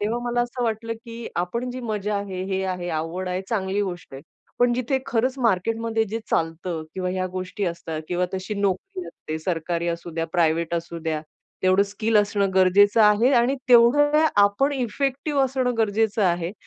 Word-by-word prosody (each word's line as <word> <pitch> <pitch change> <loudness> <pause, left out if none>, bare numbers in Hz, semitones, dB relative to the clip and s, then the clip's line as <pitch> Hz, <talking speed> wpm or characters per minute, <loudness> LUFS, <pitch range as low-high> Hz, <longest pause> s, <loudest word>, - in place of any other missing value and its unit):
तेव्हा 220 +3 -1
मला 240 0 0
असं 245 +1 -4
वाटलं 230 0 -2
की 230 0 -8
आपण 235 +8 -2
जी 255 +1 -6
मजा 210 -3 -2
आहे, 195 -2 -4
हे 190 0 -2
आहे, 180 -1 -3
आवड 165 +3 -3
आहे, 180 +1 -2
चांगली 200 -2 -1
गोष्ट 175 -7 -6
आहे. 135 - -9 0.4
पण 245 0 +4
जिथे 255 +2 0
खरंच 255 +1 0
मार्केटमध्ये 225 +1 +1
जे 220 +2 -4
चालतं 165 0 -1
किंवा 185 -1 -2
ह्या 185 0 -1
गोष्टी 185 +2 -4
असतात 165 -2 -4
किंवा 180 0 0
तशी 190 +3 -4
नोकरी 205 - -2
असते, 155 0 -6
सरकारी 170 0 -2
असुद्या 170 -1 -3
प्रायव्हेट 170 -1 +1
असू 170 0 -4
द्या. 160 -1 -2 0.4
तेवढं 185 +1 +4
स्किल 215 +2 -1
असणं 205 -1 +2
गरजेचं 200 +4 +5
आहे 210 +6 +5
आणि 245 +3 +1
तेवढं 290 +6 +6 0.2
आपण 205 +8 +2
इफेक्टिव्ह 275 +3 -1
असणं 255 -1 0
गरजेचं 220 0 +1
आहे. 175 -1 +1
200 Hz, 170 wpm, -24 LUFS, 180-235 Hz, 0.4 s, तेवढं